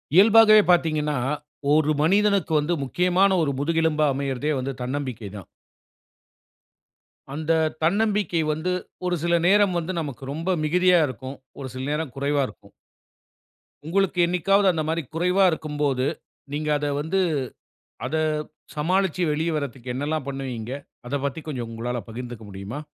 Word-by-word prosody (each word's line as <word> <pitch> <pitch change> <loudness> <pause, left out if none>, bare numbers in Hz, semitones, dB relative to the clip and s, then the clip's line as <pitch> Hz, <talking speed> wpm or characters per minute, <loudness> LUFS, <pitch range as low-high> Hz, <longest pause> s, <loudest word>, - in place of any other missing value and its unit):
இயல்பாகவே 215 +2 +8
பார்த்தீங்கன்னா, 155 -4 +1 0.6
1 155 0 +3
மனிதனுக்கு 200 +1 +2
வந்து 150 +4 0
முக்கியமான 180 +7 +2
1 150 -3 +1
முதுகெலும்பா 160 0 +2
அமயறதே 140 +1 -2
வந்து 130 +2 -3
தன்னம்பிக்கை 125 -5 -4
தான். 95 -4 -9 1.9
அந்த 155 +2 -2 0.3
தன்னம்பிக்கை 200 -1 +1
வந்து, 160 +4 -2 0.3
1 180 0 +1
சில 170 0 +1
நேரம் 200 -1 +4
வந்து 170 +3 -4
நமக்கு 140 -5 -7
ரொம்ப 170 +5 -1
மிகுதியா 180 +3 +4
இருக்கும். 130 +3 -7 0.2
1 135 - -5
சில 130 - -4
நேரம் 150 -3 -2
குறைவா 140 +1 +1
இருக்கும். - - -16 1.2
உங்களுக்கு 190 +1 +1
என்னைக்காவது 195 +3 +3
அந்த 160 -3 -2
மாரி 165 +1 0
குறைவா 180 +3 +3
இருக்கும்போது, 145 -4 -1 0.5
நீங்க 150 +1 -2
அத 145 - -3 0.2
வந்து 165 +6 0 0.9
அத 135 +5 -2 0.6
சமாளிச்சு, 185 +3 +1
வெளிய 160 +3 0
வறதுக்கு 130 -4 -4
என்னெல்லாம் 145 +2 -2
பண்ணுவீங்க? 130 -4 -5 0.4
அதைப் 140 +2 -2
பத்தி 140 +4 -6
கொஞ்சம் 125 -6 -4
உங்களால 120 +2 -3
பகிர்ந்துக்க 120 0 -7
முடியுமா? 100 +8 -6
155 Hz, 130 wpm, -24 LUFS, 135-180 Hz, 1.9 s, இயல்பாகவே